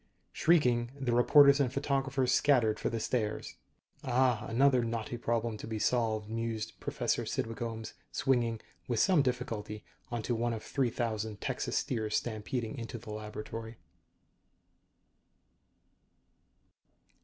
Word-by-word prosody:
Shrieking, 125 -8 +3
the 125 -3 0
reporters 140 +3 +7
and 130 -4 +2
photographers 135 -1 0
scattered 120 -7 +3
for - - -1
the 115 - -2
stairs. 110 -2 -2 0.5
Ah, 125 -3 +2
another 130 +1 +4
knotty 115 0 -3
problem 115 -1 -1
to - - -8
be 110 -1 -3
solved, 110 -2 +1
mused 115 0 -3
Professor - - -1
Cydwick 115 +3 -3
Ohms, 115 -2 -5 0.2
swinging, 120 -4 +1 0.3
with 120 -3 0
some 185 -6 +5
difficulty, 115 -5 -3 0.3
onto 120 0 -2
one 120 +1 0
of 110 - -5
three 135 -3 0
thousand 110 -3 -3
Texas - - -2
steers 110 -3 -1
stampeding 115 +2 -3
into 115 0 -5
the 110 -1 -9
laboratory. 110 +1 -6
115 Hz, 120 wpm, -31 LUFS, 110-125 Hz, 0.5 s, reporters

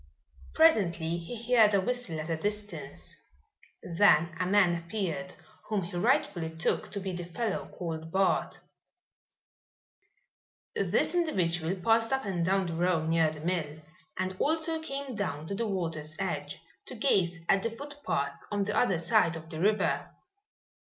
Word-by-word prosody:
Presently 170 - +3
he 235 +7 -5
heard 215 -4 +6
a - - +4
whistle 220 -6 -2
at 155 +2 -5
a - - +1
distance. 205 +4 -5 0.7
Then 170 -2 +4
a 180 - 0
man 190 -3 +4
appeared 170 -4 -3 0.3
whom 210 -3 0
he 175 - -7
rightfully 180 - +1
took 160 0 -1
to 200 - -2
be 190 -1 -4
the 175 -1 -4
fellow 200 +5 -3
called 160 -2 -5
Bart. 190 +1 +1 2.2
This - - +1
individual 180 - +1
passed 225 +5 +2
up 265 -2 0
and 180 -4 -1
down 190 +2 +2
the 170 - -3
road 165 -1 +1
near 165 -1 +3
the 155 -1 -9
mill 160 -3 -2 0.4
and 185 0 -2
also 320 +1 +1
came 275 -3 -5
down 170 -8 -3
to 200 - -4
the 225 +3 -1
water's 165 -6 -3
edge, 150 -7 -3 0.3
to - - -7
gaze 180 -9 +1
at 195 - +4
the 230 - -1
footpath 230 - -4
on 205 -1 0
the 210 +1 -2
other 195 -8 +3
side 170 0 +3
of 160 0 -9
the 160 - -5
river. 210 +4 +1
185 Hz, 150 wpm, -29 LUFS, 165-215 Hz, 2.2 s, heard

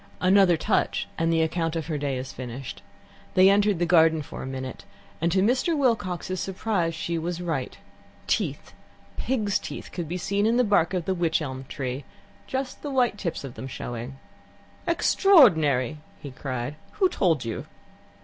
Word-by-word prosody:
Another 185 -2 +5
touch, 205 +5 0
and 165 0 +1
the 165 -1 +3
account 165 0 -1
of 160 -2 -2
her 155 -2 -3
day 140 -2 -1
is 130 +1 -6
finished. 130 +1 -7 0.5
They 185 +1 +7
entered 205 -1 +3
the 175 - +1
garden 160 -2 +4
for - - -8
a - - -5
minute, 130 -1 -6 0.4
and 170 +1 +2
to 190 +1 +3
Mr. 260 - +2
Wilcox's 185 - 0
surprise 185 -3 -1
she 170 +1 -2
was 170 +1 -3
right. 160 -7 -3 0.5
Teeth, - - -2 0.4
pigs' 220 -6 0
teeth, - - -8
could 175 -3 -4
be 180 - -2
seen 200 +4 0
in 230 +2 +2
the 250 - +4
bark 200 -5 +2
of 175 -3 -2
the 190 - +1
wych 170 -3 +1
elm 130 -3 -5
tree 130 0 -4 0.4
just 265 0 -4
the 290 - -4
white 250 -6 +1
tips 170 -6 -3
of 135 -3 -7
them 115 +4 -7
showing. 120 +1 -6 0.7
"Extraordinary!" 160 - +4 0.2
he 140 - -8
cried. 130 +1 -4 0.2
"Who 385 - +3
told 165 - +1
you?" 115 - -4
170 Hz, 170 wpm, -26 LUFS, 140-200 Hz, 0.7 s, They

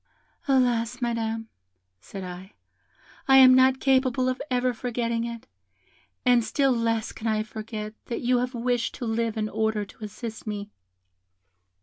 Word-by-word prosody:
'Alas! 245 -3 +2
Madam,' 225 -2 -2 0.5
said 195 - -8
I, 180 +2 -9 0.7
'I 270 0 +7
am 260 -1 +9
not 260 0 +5
capable 260 -1 +2
of 255 - -3
ever 250 0 +1
forgetting 235 -1 -2
it, 235 -1 -7 0.8
and 245 -2 +5
still 275 +4 +1
less 230 -2 0
can 225 - -6
I 215 -1 +1
forget 215 0 -6
that 235 - -4
you 245 0 +2
have 250 +1 -2
wished 240 0 -1
to 245 - -5
live 225 0 -1
in 215 0 0
order 220 -1 -1
to 215 - -14
assist 220 +2 -7
me.' 205 -1 -5
230 Hz, 145 wpm, -26 LUFS, 220-250 Hz, 0.8 s, am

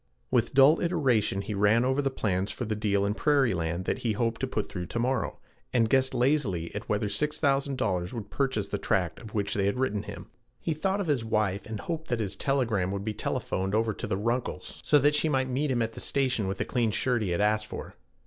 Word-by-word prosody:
With 125 0 +1
dull 140 +4 +7
iteration 130 - +1
he 105 - -4
ran 105 +4 +3
over 130 +2 +2
the 135 - +1
plans 100 -6 -1
for 120 - -4
the 110 - -1
deal 100 -2 +1
in 100 - +1
prairie 140 -2 +3
land 85 +1 -2
that - - -1
he 115 -3 0
hoped 115 +1 -1
to 130 - 0
put 110 -4 -2
through 90 -2 -5
to - - -5
morrow, 125 0 0 0.3
and 115 -3 +3
guessed 130 -1 +3
lazily 120 - +1
at 105 - -6
whether 105 +1 +1
$6000 135 - 0
would 115 -4 -7
purchase 130 -7 0
the - - -2
tract 90 -6 0
of 110 -2 -10
which 100 -2 0
they 100 -1 +1
had 100 - 0
written 125 -6 0
him. - - -9 0.3
He 165 - -1
thought 190 +6 0
of - - -2
his 145 -7 +1
wife, 105 -3 0
and 110 -2 -5
hoped 160 -1 -4
that 120 -2 -1
his 100 -3 -2
telegram 115 -7 0
would 100 +1 -3
be 110 - -1
telephoned 95 -1 -2
over 110 0 +1
to - - -5
the 95 - -1
Runkles' 115 +4 -2
so 150 - +4
that 145 +1 +4
she 155 +1 +2
might 130 -2 +1
meet 140 +4 0
him 120 -3 +1
at 115 0 -3
the - - -8
station 130 -7 0
with 95 - -2
the - - -1
clean 120 -3 +1
shirt 120 +2 0
he 100 - -1
had 85 - 0
asked 110 +1 +2
for. - - -7
115 Hz, 235 wpm, -28 LUFS, 100-135 Hz, 0.3 s, dull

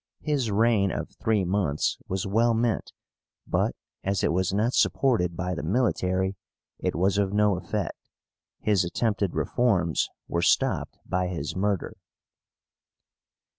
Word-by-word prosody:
His 140 -7 0
reign 105 -1 +3
of - - -4
three 110 -4 +2
months 90 -6 0
was 95 0 -2
well 115 +4 +2
meant, 115 0 0 0.5
but - - 0 0.3
as 95 -1 0
it - - +3
was 95 +2 +1
not 110 +6 +1
supported 90 -11 +2
by 90 +1 -2
the 85 - -3
military 95 -2 0 0.4
it - - -1
was 95 +4 +2
of 100 -1 0
no 105 -1 +3
effect. 95 0 -3 0.7
His 100 -4 +3
attempted 100 +1 -1
reforms 95 -10 +1 0.2
were 85 - -1
stopped - - +1
by 90 0 0
his 80 -5 -4
murder. 100 -1 -1
100 Hz, 130 wpm, -26 LUFS, 90-110 Hz, 0.7 s, reign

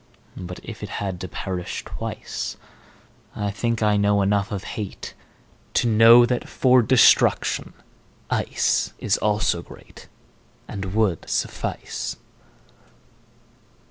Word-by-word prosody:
But 90 0 -7
if - - -9
it - - -6
had 95 -3 -4
to 95 - -4
perish 90 +1 -5
twice,I 105 -1 -7
think 115 +2 -1
I 105 -1 +3
know 100 0 +2
enough 100 0 0
of 100 -2 -4
hateTo 105 -3 -7 0.7
know 115 +2 +7
that 120 0 -2
for 130 -1 +4
destruction 125 +2 +3 0.6
iceIs - - 0
also 105 -5 +1
greatAnd 95 +2 -12
would 105 -7 0
suffice. - - -3
105 Hz, 95 wpm, -23 LUFS, 95-115 Hz, 0.7 s, know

